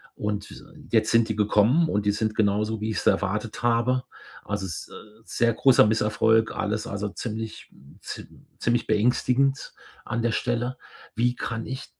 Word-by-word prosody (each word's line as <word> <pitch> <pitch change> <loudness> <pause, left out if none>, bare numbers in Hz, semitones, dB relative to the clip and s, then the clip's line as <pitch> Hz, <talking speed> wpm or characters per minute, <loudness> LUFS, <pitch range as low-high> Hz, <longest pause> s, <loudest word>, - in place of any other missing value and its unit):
Und 105 +4 -4 0.3
jetzt 110 -1 +3
sind 115 0 +3
die 110 - -1
gekommen 110 +9 +3
und 105 0 0
die 105 - +4
sind 110 +1 -1
genauso, 105 +1 +1
wie 110 - -2
ich's - - -2
erwartet 105 +4 0
habe. 120 +2 +2 0.4
Also 100 -1 -3
s 85 - -7 0.3
sehr 115 +1 +1
großer 125 -1 +5
Misserfolg, 110 +1 +2
alles 105 +1 -2
also 100 +1 -3
ziemlich 110 +1 -6 0.3
ziem - - -10
ziemlich 120 0 0
beängstigend 125 +5 +1 0.3
an 115 - -2
der 115 -1 +1
Stelle. 120 +2 -1 0.4
Wie 120 +2 +2
kann 115 -1 -4
ich 130 +1 -6
110 Hz, 150 wpm, -25 LUFS, 105-120 Hz, 0.4 s, großer